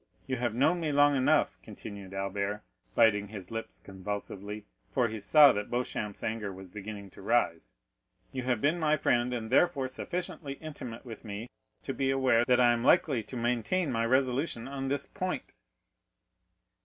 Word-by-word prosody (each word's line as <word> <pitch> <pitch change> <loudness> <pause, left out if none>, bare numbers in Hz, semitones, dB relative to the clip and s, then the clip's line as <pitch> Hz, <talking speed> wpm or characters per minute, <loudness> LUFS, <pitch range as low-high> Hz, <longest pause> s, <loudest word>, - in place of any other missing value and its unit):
You 130 - -2
have 120 -2 -1
known 160 +8 +3
me 160 -3 -1
long 145 0 +5
enough," 130 -1 +2
continued 100 -3 -9
Albert, 100 +1 -2 0.3
biting 105 -3 +4
his 100 -2 -9
lips 115 0 -5
convulsively, 100 +1 -6 0.2
for 125 -3 +2
he 110 -1 -5
saw 145 +9 +7
that 105 0 -3
Beauchamp's 115 -4 -3
anger 110 -2 -2
was 95 0 -10
beginning 100 0 -8
to - - -13
rise,—"you 85 - -3
have 125 -3 0
been 155 +5 +2
my 155 -1 +3
friend, 120 -3 +2
and 115 -2 -4
therefore 140 -2 +3
sufficiently 155 +1 -5
intimate 140 -6 -8
with 115 -3 -9
me 110 +2 -6 0.3
to 135 - -3
be 135 0 0
aware 130 -3 +3
that 125 0 +4
I 120 -1 +6
am 120 0 -2
likely 130 -2 +4
to 125 +4 -8
maintain 125 +8 0
my 115 -1 0
resolution 130 0 +1
on 135 0 -4
this 140 +1 -1
point." 185 -2 -4
120 Hz, 165 wpm, -30 LUFS, 105-135 Hz, 0.3 s, saw